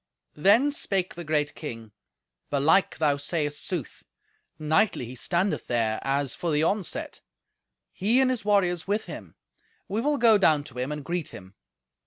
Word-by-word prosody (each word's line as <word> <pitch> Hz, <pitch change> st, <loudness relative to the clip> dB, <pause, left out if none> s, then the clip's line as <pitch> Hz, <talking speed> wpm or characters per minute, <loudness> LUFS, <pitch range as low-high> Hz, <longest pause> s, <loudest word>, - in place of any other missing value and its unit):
Then 210 Hz, -, +4 dB
spake 195 Hz, -9 st, -1 dB
the 175 Hz, -, -7 dB
great 150 Hz, -2 st, 0 dB
king, 115 Hz, -7 st, -8 dB, 0.6 s
"Belike 145 Hz, +7 st, +3 dB
thou 145 Hz, -3 st, +2 dB
sayest 145 Hz, 0 st, -2 dB
sooth. 175 Hz, -8 st, -5 dB, 0.6 s
Knightly 155 Hz, -, +1 dB
he 120 Hz, -, -9 dB
standeth 170 Hz, +10 st, -1 dB
there 110 Hz, -2 st, 0 dB
as 135 Hz, -1 st, -1 dB
for 175 Hz, -, -3 dB
the 150 Hz, +1 st, +2 dB
onset—he 205 Hz, +3 st, -3 dB
and 260 Hz, -1 st, +3 dB
his 250 Hz, -5 st, -3 dB
warriors 185 Hz, -5 st, +1 dB
with 205 Hz, +2 st, -1 dB
him. -, -, -9 dB, 0.5 s
We 210 Hz, +3 st, -2 dB
will 290 Hz, +3 st, +1 dB
go 225 Hz, -4 st, +5 dB
down 155 Hz, -6 st, +3 dB
to 130 Hz, -4 st, -10 dB
him 130 Hz, +3 st, -2 dB
and 150 Hz, -2 st, -5 dB
greet 175 Hz, -2 st, -3 dB
him." 95 Hz, +1 st, -12 dB
160 Hz, 155 wpm, -26 LUFS, 145-200 Hz, 0.6 s, go